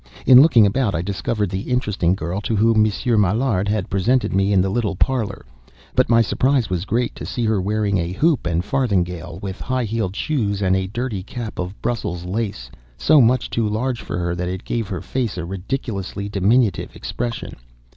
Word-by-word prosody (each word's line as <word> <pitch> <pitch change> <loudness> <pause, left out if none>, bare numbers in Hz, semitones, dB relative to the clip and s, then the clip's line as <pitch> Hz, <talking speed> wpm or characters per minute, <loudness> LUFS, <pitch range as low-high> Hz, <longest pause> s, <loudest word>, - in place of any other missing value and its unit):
In 130 0 +9
looking 130 -8 +6
about, 105 +1 +1
I 85 - -1
discovered 100 +1 -2
the 95 +4 -4
interesting 105 -8 +1
girl 90 +3 -3
to 110 - -1
whom 110 +1 +4
Monsieur 110 +2 +1
Maillard 105 0 +1
had 105 -1 -1
presented 120 +7 +1
me 95 +1 +2
in 100 - +4
the 95 +1 +1
little 105 -3 -1
parlor; 110 -2 -1 0.5
but - - +2
my 115 -1 +5
surprise 130 -1 +1
was 90 0 -1
great 120 +3 0
to - - -9
see 120 - -2
her 110 -3 +1
wearing 100 0 0
a 85 +1 -2
hoop 150 - +1
and 85 +2 0
farthingale, 90 - -1
with 95 -1 -5
high 130 0 -1
heeled 110 -3 -2
shoes, 105 -7 -1
and 95 -2 +2
a 95 0 -1
dirty 115 -1 -3
cap 110 +3 -7
of 90 +3 -5
Brussels 95 -7 -2
lace, 95 - -4 0.3
so 100 - +5
much 125 +1 +3
too 115 -2 0
large 120 +3 -2
for 100 - -5
her 85 -1 -1
that 90 +1 -3
it 95 0 -5
gave 115 -3 -2
her 90 -3 -4
face 110 +2 -3
a 90 - -3
ridiculously 100 +1 -4
diminutive 105 0 +1
expression. 120 -1 -5
105 Hz, 195 wpm, -21 LUFS, 95-120 Hz, 0.5 s, In